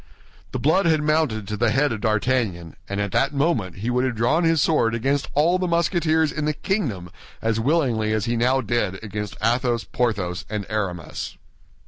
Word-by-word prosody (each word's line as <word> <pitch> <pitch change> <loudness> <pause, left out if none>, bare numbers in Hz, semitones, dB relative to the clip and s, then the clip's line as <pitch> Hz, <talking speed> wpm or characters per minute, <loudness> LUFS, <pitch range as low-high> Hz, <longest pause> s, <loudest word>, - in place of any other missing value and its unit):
The - - -2
blood 170 +5 +2
had 155 -2 +2
mounted 150 -10 +1
to 105 - -3
the 120 +2 +2
head 135 +5 +2
of 110 -2 -4
D'Artagnan, 110 -7 0
and 100 +1 -2
at 100 -1 -1
that 140 +7 +1
moment 135 - 0
he 110 +6 -3
would 125 +1 +1
have 130 -2 -1
drawn 120 +10 +2
his 165 -1 +3
sword 120 -7 +2
against 135 +5 0
all 170 +5 +3
the 185 - 0
Musketeers 170 -2 +2
in 150 - -3
the 150 - +1
kingdom 120 - -2 0.3
as 115 0 0
willingly 120 -5 +1
as 110 -1 0
he 120 - 0
now 125 +3 +2
did 105 -4 -1
against 105 -1 -5
Athos, 120 0 +1
Porthos, 100 -8 -1
and 105 -2 -3
Aramis. 95 -6 -4
120 Hz, 185 wpm, -23 LUFS, 105-150 Hz, 0.3 s, his